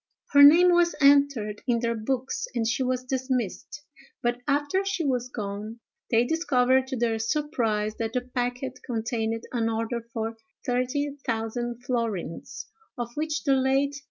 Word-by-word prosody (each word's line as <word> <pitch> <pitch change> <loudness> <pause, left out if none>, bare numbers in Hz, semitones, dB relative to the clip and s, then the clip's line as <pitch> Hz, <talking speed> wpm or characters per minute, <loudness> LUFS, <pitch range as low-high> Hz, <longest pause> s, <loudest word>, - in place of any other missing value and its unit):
Her 285 - +7
name 335 +5 +8
was 345 0 +3
entered 280 -7 +3
in 240 -2 +3
their 235 0 0
books 250 +4 -2
and 230 -2 0
she 235 - 0
was 255 0 0
dismissed; 260 0 -3 0.4
but, 240 0 0
after 290 +7 +1
she 390 -4 -2
was 250 -2 0
gone, 210 0 -5 0.3
they 235 +1 +3
discovered 260 -4 +2
to 260 - -3
their 230 -1 0
surprise 225 -5 0
that 225 0 -3
the 250 - 0
packet 250 +1 -3
contained 225 -1 -2
an 230 -2 0
order 230 +1 -2
for 225 0 -3 0.3
thirty 260 +3 -1
thousand 235 +1 -3
florins, 225 -10 -3 0.3
of 240 -1 -4
which 310 +2 -2
the 275 - +3
late 270 +1 +2
Mr. - - -14
St. - - -8
245 Hz, 155 wpm, -26 LUFS, 225-280 Hz, 0.4 s, name